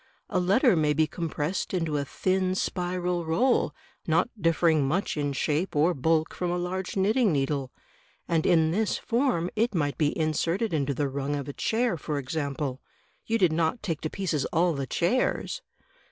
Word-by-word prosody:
A 185 - +2
letter 200 +5 +4
may 150 -2 +2
be 155 +2 +3
compressed 165 +3 -3
into 165 -4 -1
a 140 - -1
thin 185 +4 0
spiral 180 -1 -1
roll, 195 - +2 0.4
not 170 +8 +2
differing 165 -3 +3
much 175 +8 0
in 145 -2 -1
shape 150 +6 -1
or 160 +5 +3
bulk 160 +2 +1
from 180 - -2
a 175 - 0
large 185 +2 -3
knitting 215 +3 +3
needle, 135 -2 -1 0.6
and 165 -2 +1
in 160 -3 +4
this 215 +4 0
form 230 -8 0
it 225 0 +1
might 145 -3 -1
be 150 - +3
in 155 +1 0
serted 170 +7 -1
into 140 -2 0
the 145 +2 0
rung 140 +1 -2
of 140 -1 -4
a 145 - -5
chair, 225 - 0
for 150 0 -3
example. 140 -1 -3 0.5
You 230 - +2
did 180 -7 +3
not 165 +8 0
take 165 -7 -2
to 155 - -2
pieces 160 -7 -1
all 170 +1 +2
the 140 -2 -3
chairs?" 240 - 0
165 Hz, 180 wpm, -27 LUFS, 150-185 Hz, 0.6 s, letter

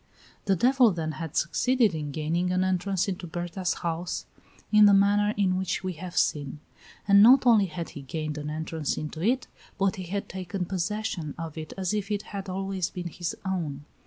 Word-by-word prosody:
The 195 - +3
devil 250 +4 +5
then 165 -4 -2
had 160 0 -6
succeeded 250 -6 +2
in 150 -2 -4
gaining 165 +5 -1
an 185 0 +2
entrance 185 0 0
into 185 -2 -4
Berta's 175 +2 -2
house 170 +1 -2 0.5
in 210 -1 +8
the 200 - +6
manner 205 +1 +3
in 185 -2 +2
which 190 +1 -2
we 185 -1 -2
have 180 +2 -8
seen; 145 0 0 0.5
and 200 0 +7
not 255 +4 +7
only 220 -5 +5
had 165 0 -5
he 145 - -9
gained 150 +2 -4
an 150 0 -5
entrance 160 -1 -3
into 155 +1 -5
it, 245 +7 +1 0.3
but 195 -1 +1
he 185 - -5
had 200 +3 -3
taken 185 0 -4
possession 185 -3 -3
of 165 -2 -6
it 155 -1 -7
as 190 0 -1
if 205 -1 -2
it 205 -1 -1
had 195 -1 -5
always 190 -1 -2
been 175 -1 -5
his 170 +1 -4
own. 155 -7 -3
185 Hz, 190 wpm, -27 LUFS, 160-200 Hz, 0.5 s, in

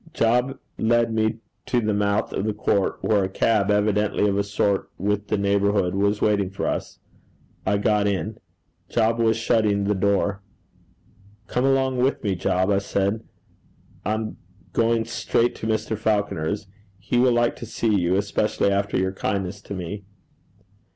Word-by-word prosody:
Job 125 +4 +2 0.2
led 115 0 +2
me 110 0 +1 0.3
to 125 - +2
the 110 -2 0
mouth 100 +1 0
of - - -1
the 110 -1 -1
court, 100 -2 +1
where 105 -3 +3
a 95 - -1
cab, 100 +1 +1
evidently 105 0 +2
of 100 - +1
a 100 - +1
sort 100 -1 0
with 105 +2 -1
the 105 - 0
neighbourhood, 100 -2 +1
was 100 +1 +1
waiting 100 -3 +2
for 95 - -4
us. - - -3 0.7
I 100 +1 +3
got 105 0 +2
in. 100 +2 -2 0.5
Job 115 0 +1
was 115 -1 +3
shutting 110 -3 +2
the 100 +1 +1
door. 100 0 +1 1.0
'Come 125 +3 0
along 135 -1 +2
with 130 +1 +1
me, 100 -3 +1
Job,' 95 +2 +1
I 100 - +3
said. 100 +2 -1 0.8
'I'm 110 +1 -2 0.4
going 115 0 +2
straight 120 +1 0
to 110 - -4
Mr. 110 0 -1
Falconer's. 105 -4 -1 0.3
He 105 +5 -1
will 125 0 +5
like 120 0 +2
to 120 - -8
see 110 0 0
you, 90 -2 +2
especially 100 0 +1
after 100 +1 0
your 95 0 0
kindness 95 0 -3
to 100 - -7
me.' 95 +3 -5
105 Hz, 160 wpm, -24 LUFS, 100-110 Hz, 1.0 s, will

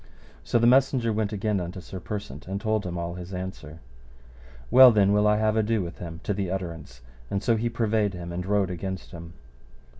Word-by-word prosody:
So - - +1
the 115 - +3
messenger 125 -2 +3
went 105 -1 -1
again 105 -1 -1
unto 90 +1 -5
Sir 95 +2 -8
Persant 90 -8 -7
and 95 +1 -3
told 110 -2 -1
him 90 0 -4
all 85 0 -3
his 90 +1 -7
answer. 90 -4 -7 0.9
Well 130 +1 +9
then 100 -2 +3
will 105 0 +3
I 105 0 +4
have 110 0 +1
ado 110 -2 +1
with 85 0 -8
him 85 -1 -7
to 105 - -1
the 95 -2 -2
utterance, 85 -9 -6 0.3
and 100 0 -2
so 115 - +3
he 115 +2 -1
purveyed 110 -4 0
him 85 -1 -7
and 90 +1 -4
rode 100 -1 +1
against 95 +1 -5
him. 85 -2 -10
100 Hz, 205 wpm, -26 LUFS, 90-110 Hz, 0.9 s, Well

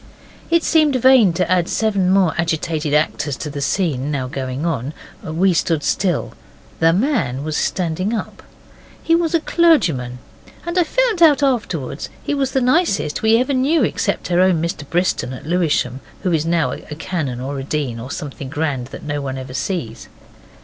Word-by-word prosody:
It 335 0 +3
seemed 305 -4 +3
vain 255 -5 +5
to 180 +1 0
add 180 -1 +1
seven 200 -4 +1
more 190 -3 +3
agitated 160 -2 -1
actors 150 -2 0
to 150 +5 -5
the 140 0 -5
scene 145 -4 0
now 140 -3 -2
going 130 +1 -4
on. 145 -3 -2 0.3
We 175 +4 +1
stood 165 -2 0
still. 180 -6 0 0.5
The 165 0 +5
man 175 - 0
was 155 0 -3
standing 185 +5 -1
up. 230 - -4 0.6
He 330 - +2
was 335 0 +2
a - - +4
clergyman, 170 - +2 0.5
and 345 +1 -3
I - - +5
found 475 -1 +1
out 295 -4 +6
afterwards 170 - -1
he - - -2
was 275 -2 -1
the 265 - +2
nicest 250 - +1
we 220 +1 +4
ever 255 +4 0
knew 275 +5 +2
except - - -1
our 175 - +3
own 185 -3 +4
Mr 160 -3 -4
Briston 175 -6 0
at 130 - -9
Lewisham, 155 -7 0 0.2
who 185 - +1
is 160 -1 0
now 165 -1 +1
a 150 - -7
canon 155 -6 -3
or 135 +2 -4
a - - -5
dean, 135 -5 -3
or 125 +3 -7
something 140 -2 -6
grand 145 -4 -2
that - - -10
no 145 -1 -3
one 135 -1 -4
ever 130 0 -7
sees. 145 - -4
165 Hz, 180 wpm, -19 LUFS, 145-225 Hz, 0.6 s, out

